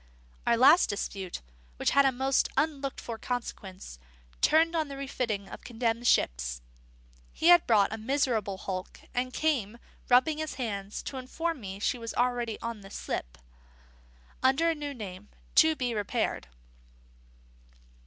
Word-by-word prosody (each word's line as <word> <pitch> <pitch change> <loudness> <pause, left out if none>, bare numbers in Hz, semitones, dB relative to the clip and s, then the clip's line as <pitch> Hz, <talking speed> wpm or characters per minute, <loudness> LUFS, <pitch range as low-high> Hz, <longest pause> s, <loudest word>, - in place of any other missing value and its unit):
Our 235 - +4
last 285 +8 +7
dispute, 195 - -4 0.3
which - - +1
had 280 -1 +5
a - - +3
most 265 +1 +1
unlooked 285 -3 0
for 230 -2 -6
consequence, 195 - -5 0.4
turned 325 +2 +4
on 315 -2 +1
the 275 -1 -7
refitting 235 -7 -3
of - - -10
condemned 235 0 -1
ships. - - +2 0.7
He 330 - +2
had 350 -1 +7
bought 210 -2 +4
a 220 - -5
miserable 225 -5 0
hulk, 185 -1 -6
and 255 +1 -1
came, 250 -8 0 0.3
rubbing 260 +5 +4
his 315 -1 -3
hands, 205 -5 -4
to 270 - -5
inform 305 +4 -3
me 190 -1 -6
she 230 +4 -1
was 230 -1 -6
already 240 -3 0
on 230 -2 -5
the 195 - -12
slip, - - -5 1.0
under 280 +6 +3
a - - 0
new 290 -2 -5
name, 205 -3 -8 0.2
to 320 0 +6
be 250 -4 -1
repaired. 205 - -1
245 Hz, 145 wpm, -29 LUFS, 205-275 Hz, 1.0 s, last